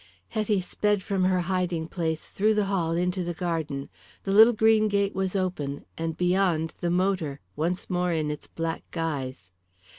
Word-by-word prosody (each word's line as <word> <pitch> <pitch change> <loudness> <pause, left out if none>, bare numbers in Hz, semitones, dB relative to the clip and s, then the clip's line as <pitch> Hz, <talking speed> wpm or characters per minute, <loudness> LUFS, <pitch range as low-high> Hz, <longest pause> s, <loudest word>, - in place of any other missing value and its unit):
Hetty 215 -3 +1
sped 205 +2 0
from 190 -2 0
her 185 -1 +3
hiding 175 -2 -1
place 160 -2 -2
through 215 +2 +1
the 210 -1 +2
hall 180 -4 0
into 180 +2 0
the 175 0 -3
garden. 160 -5 -2 0.4
The 195 - -2
little 220 +4 +8
green 220 -1 +4
gate 200 -1 +1
was 190 0 -1
open, 165 -7 -2
and 165 0 -3
beyond 180 -3 +2
the 175 - -1
motor, 175 -5 0 0.2
once 170 +4 -1
more 180 -1 0
in 155 -2 0
its 150 - -7
black 165 0 -3
guise. 135 - -4
180 Hz, 170 wpm, -27 LUFS, 160-195 Hz, 0.4 s, little